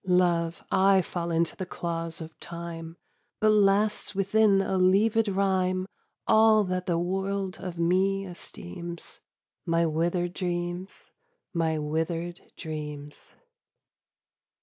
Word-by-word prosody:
Love! 175 -2 +2
I 190 0 +5
fall 170 -1 -4
into 165 0 +1
the 185 - -4
claws 165 -1 -4
of 160 0 -10
Time: 170 -1 -7 0.4
But 215 0 +4
lasts 205 0 +2
within 200 +1 +4
a 195 0 0
leavèd 205 +3 +3
rhyme 185 -1 +1 0.4
All 220 -1 +5
that 185 -1 -2
the 170 -2 +1
world 190 +2 -2
of 180 -2 -6
me 190 +3 +2
esteems 170 - -8 0.4
My 170 -1 +2
withered 175 +2 0
dreams, 175 +1 -4 0.4
my 165 -2 +1
withered 165 +3 -2 0.2
dreams. 150 -2 -7
180 Hz, 110 wpm, -27 LUFS, 170-195 Hz, 0.4 s, I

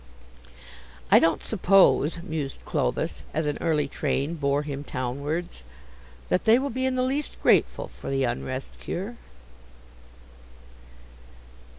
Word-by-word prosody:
"I - - +9
don't 165 - +2
suppose," 180 -5 +3
mused 155 -6 -4
Clovis, - - -1
as 155 0 0
an 145 -1 -2
early 150 -4 +1
train 140 +2 -1
bore 145 -2 0
him 145 -1 -5
townwards, 140 +7 -4 0.7
"that 180 - +1
they 225 +1 +7
will 275 +2 -2
be 260 +2 -1
in 260 - 0
the 255 - +1
least 275 +3 -2
grateful - - +3
for - - -9
the 135 0 +1
Unrest 130 +2 -3
cure." 205 +7 -5
160 Hz, 120 wpm, -26 LUFS, 140-200 Hz, 0.7 s, I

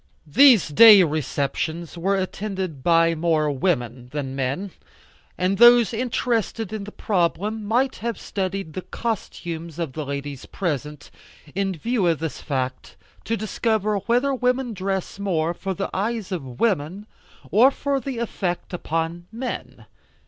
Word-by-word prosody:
These 225 - +6
day 210 +4 +9
receptions 155 +2 -2
were 190 +4 0
attended 190 -5 -3
by 165 +2 +4
more 155 -2 +1
women 125 -5 -1
than 135 -1 -4
men, 140 +9 -2 0.7
and 185 +2 0
those 240 -1 +7
interested 230 -3 -1
in 210 -2 -4
the 210 - -8
problem 205 +3 -1
might 245 +6 +1
have 230 -2 -4
studied 195 -4 -4
the 185 - -4
costumes 170 -8 -5
of 165 -6 -3
the 155 - -4
ladies 140 -1 -5
present, 150 -5 -4 0.4
in 195 0 -1
view 220 +3 0
of 165 -2 +2
this 160 0 -5
fact, 130 -2 -3 0.3
to 230 - -1
discover 215 -1 0
whether 240 +7 +1
women 250 -1 0
dress 190 0 -3
more 170 -4 0
for 190 +2 -4
the 195 - -3
eyes 210 +1 -2
of 135 -9 -5
women 195 -2 0 0.5
or 235 +6 +7
for 280 0 -1
effect 230 -9 -3
upon 165 0 -3
men. 245 +3 -6
185 Hz, 135 wpm, -23 LUFS, 160-220 Hz, 0.7 s, day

